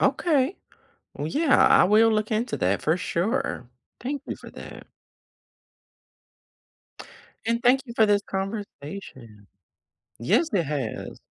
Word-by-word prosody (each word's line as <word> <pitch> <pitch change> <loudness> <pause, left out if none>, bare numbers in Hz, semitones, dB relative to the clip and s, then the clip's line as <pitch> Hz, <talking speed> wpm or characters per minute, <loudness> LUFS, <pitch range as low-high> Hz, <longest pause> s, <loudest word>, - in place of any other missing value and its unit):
Okay. 305 0 +2 0.6
Well, 145 - -4
yeah, 290 - +2
I - - +6
will 215 +4 +5
look 215 +1 -1
into 225 +2 -1
that, 95 +2 0
for 160 +3 +1
sure. 210 - -2 0.3
Thank 275 +3 -4
you - - -4
for - - -12
that. - - -11 2.6
And 230 +1 +1
thank 255 +2 +5
you 235 - -8
for 220 -2 +4
this 205 0 +2
conversation. 190 - -7 0.7
Yes, 310 - +2
it 175 -4 +1
has. 135 -7 -5
210 Hz, 120 wpm, -25 LUFS, 155-245 Hz, 2.6 s, I